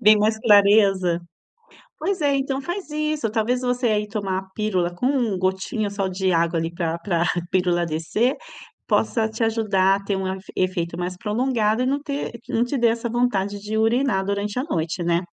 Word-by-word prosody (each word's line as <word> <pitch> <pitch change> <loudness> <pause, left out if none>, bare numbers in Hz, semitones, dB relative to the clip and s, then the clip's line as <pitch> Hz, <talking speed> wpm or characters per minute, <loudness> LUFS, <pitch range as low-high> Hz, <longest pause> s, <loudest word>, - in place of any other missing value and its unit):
vem 215 +1 +7
mais 215 +1 +2
clareza. 200 -5 +4 0.8
Pois 370 +2 -1
é, 285 -1 +2
então 270 0 -1
faz 350 +4 -5
isso. 305 -5 -1
Talvez 230 +3 0
você 250 0 0
aí 210 -1 +1
tomar 200 -3 -2
a - - -4
pílula 185 -5 0
com 245 -2 0
gotinha 190 +3 -1
só 200 -1 -2
de 185 0 0
água 165 0 +1
ali 165 +1 -2
pra 170 -1 -2
pra 170 -1 0 0.3
pílula 175 -2 +1
descer 165 - 0 0.5
possa 220 -2 +1
te 220 +1 -5
ajudar 205 -4 +2
a 200 - -8
ter 200 -1 -1
um 190 0 -2
afe 190 +1 -6
efeito 175 -2 -1
mais 180 +1 -3
prolongado 225 +1 0
e - - 0
não 280 +2 0
ter 285 -3 -4 0.2
não 230 - +1
te 245 +3 -2
dê 235 -1 +4
essa 230 +1 -1
vontade 205 -4 0
de 215 +1 -3
urinar 225 -2 +2
durante 200 +3 -2
a 255 - -1
noite, 165 - -2
né. 170 +1 +1
210 Hz, 185 wpm, -23 LUFS, 185-240 Hz, 0.8 s, vem